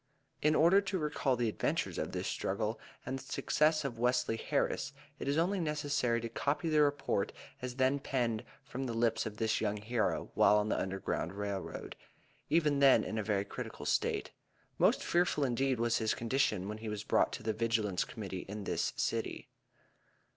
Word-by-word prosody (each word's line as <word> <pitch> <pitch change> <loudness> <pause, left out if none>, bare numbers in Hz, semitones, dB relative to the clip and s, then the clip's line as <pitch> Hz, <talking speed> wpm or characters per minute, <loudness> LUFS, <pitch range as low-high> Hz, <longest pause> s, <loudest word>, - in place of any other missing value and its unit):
In 155 +1 +3
order 175 +6 +6
to 190 -1 -2
recall 150 -4 0
the 120 -1 0
adventures 110 - -1
of - - -2
this - - -3
struggle, 105 +3 -2 0.3
and 135 +1 -3
the - - -10
success 155 0 +2
of 120 -4 -4
Wesley 125 -1 +2
Harris, - - -1 0.3
it - - -4
is 140 +2 +1
only 185 +4 +2
necessary 145 -7 0
to 115 - -3
copy 145 +8 -1
the 155 -1 +4
report 145 -1 +1 0.3
as 125 -1 -4
then 130 +2 +2
penned 120 -5 -1 0.2
from 135 -1 -5
the 115 - -3
lips 115 -1 +1
of 105 -1 -7
this 110 0 +1
young 105 -1 0
hero, 110 +2 -1
while 105 - +5
on 105 0 +1
the - - +1
Underground 95 -2 -2
Rail 100 -1 -2
Road, - - -7 0.5
even 150 -3 +3
then 135 -2 +6
in 110 - -3
a - - -1
very 100 -1 0
critical - - -7
state. - - 0 0.5
Most - - +4
fearful 175 -4 +2
indeed 130 0 +1
was 115 0 +2
his 110 -1 +1
condition 115 -5 0
when 105 +1 -5
he 110 0 -5
was 105 0 -4
brought - - +2
to 120 - -6
the 110 0 0
Vigilance 110 -4 +1
Committee 95 -4 -6
in 105 0 -5
this - - -1
City. - - -2
120 Hz, 185 wpm, -33 LUFS, 110-140 Hz, 0.5 s, order